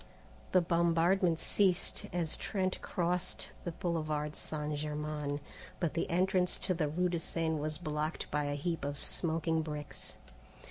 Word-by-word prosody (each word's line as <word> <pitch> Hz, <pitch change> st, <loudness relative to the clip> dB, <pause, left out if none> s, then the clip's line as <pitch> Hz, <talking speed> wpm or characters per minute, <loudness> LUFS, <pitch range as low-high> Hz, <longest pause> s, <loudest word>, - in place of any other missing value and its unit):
The 185 Hz, -, +6 dB
bombardment 170 Hz, +1 st, +4 dB
ceased 185 Hz, +2 st, +2 dB
as 170 Hz, -2 st, 0 dB
Trent 185 Hz, -2 st, -1 dB
crossed 180 Hz, +1 st, -1 dB
the 175 Hz, -, -1 dB
Boulevard 155 Hz, -3 st, -1 dB
St. 150 Hz, -1 st, -2 dB
Germain, 150 Hz, -1 st, -2 dB, 0.4 s
but 170 Hz, -4 st, +1 dB
the 165 Hz, -, 0 dB
entrance 180 Hz, +1 st, +2 dB
to 185 Hz, -, 0 dB
the 160 Hz, -3 st, +1 dB
rue 180 Hz, +4 st, +2 dB
de 170 Hz, -1 st, 0 dB
Seine 160 Hz, -1 st, 0 dB
was 155 Hz, +1 st, -1 dB
blocked 155 Hz, -1 st, -2 dB
by 150 Hz, 0 st, +1 dB
a 145 Hz, 0 st, 0 dB
heap 165 Hz, +2 st, -1 dB
of 145 Hz, 0 st, -2 dB
smoking 160 Hz, +1 st, +1 dB
bricks. 150 Hz, -2 st, -5 dB
165 Hz, 145 wpm, -34 LUFS, 150-175 Hz, 0.4 s, The